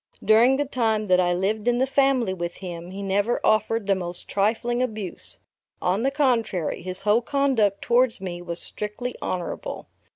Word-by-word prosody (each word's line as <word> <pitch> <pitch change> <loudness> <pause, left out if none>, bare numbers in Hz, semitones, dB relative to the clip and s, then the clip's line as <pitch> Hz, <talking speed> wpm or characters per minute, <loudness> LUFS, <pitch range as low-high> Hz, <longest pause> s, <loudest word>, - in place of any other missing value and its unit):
During 230 +5 +6
the 290 +2 0
time 225 -5 0
that 180 0 +5
I 175 -1 +2
lived 205 +5 -1
in 240 0 +3
the 260 - +3
family 270 -6 +2
with 175 -1 -4
him, 175 -2 -7
he 195 +2 -6
never 200 +4 +1
offered 215 0 +2
the 200 - +3
most 175 -2 -5
trifling 230 +4 0
abuse; 215 -7 -5 0.4
on 185 +4 0
the 265 - +2
contrary, 245 - 0
his 185 +1 -4
whole 210 +3 +3
conduct 245 -7 +1
towards 240 -1 +3
me 175 -2 -5
was 170 -1 -5
strictly 210 +4 -5
honorable. 185 - -4
215 Hz, 170 wpm, -24 LUFS, 185-245 Hz, 0.4 s, During